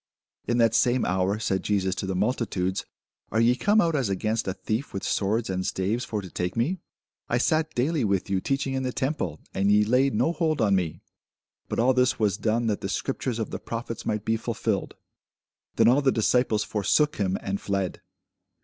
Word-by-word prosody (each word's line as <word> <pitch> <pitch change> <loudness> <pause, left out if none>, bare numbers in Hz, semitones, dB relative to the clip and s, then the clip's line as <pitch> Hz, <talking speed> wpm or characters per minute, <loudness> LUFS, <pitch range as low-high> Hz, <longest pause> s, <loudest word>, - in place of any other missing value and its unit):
In 120 +1 +1
that 115 -2 +4
same 120 +2 +3
hour 95 +2 +1
said 95 -3 -1
Jesus 95 -2 0
to 95 - -4
the 95 - -2
multitudes, 95 -3 -1 0.4
Are 110 - +1
ye 120 +2 +4
come 205 +10 +3
out 165 -5 +2
as 130 -8 0
against 110 +3 -1
a 95 - 0
thief 110 +6 -3
with 95 - -3
swords 110 +3 0
and 95 0 -2
staves 100 +7 -1
for 105 -2 -3
to 90 - -9
take 90 +1 -3
me? 160 +11 0 0.5
I 120 - +2
sat 155 +5 +1
daily 140 +3 +1
with 100 -3 0
you 95 -2 0
teaching 135 +2 -1
in 130 - -1
the 130 -1 -2
temple, 130 - -2
and 100 +1 +2
ye 105 0 +5
laid 130 +3 +2
no 160 - +2
hold 160 -3 0
on 105 -4 +3
me. 90 -4 -2 0.7
But - - -2
all 125 +3 +4
this 125 0 +2
was 105 -2 +1
done, 115 +2 0
that 105 -3 -1
the 95 - -3
scriptures 130 +1 -2
of 110 - -3
the - - -4
prophets 115 -1 -5
might 105 0 -2
be 115 0 +1
fulfilled. 110 -3 -2 0.8
Then - - +4
all 130 +4 +5
the 135 -1 +3
disciples 115 -1 +2
forsook 150 - +1
him, 95 -2 0
and 100 0 -3
fled. 100 -2 -2
110 Hz, 205 wpm, -26 LUFS, 100-125 Hz, 0.8 s, ye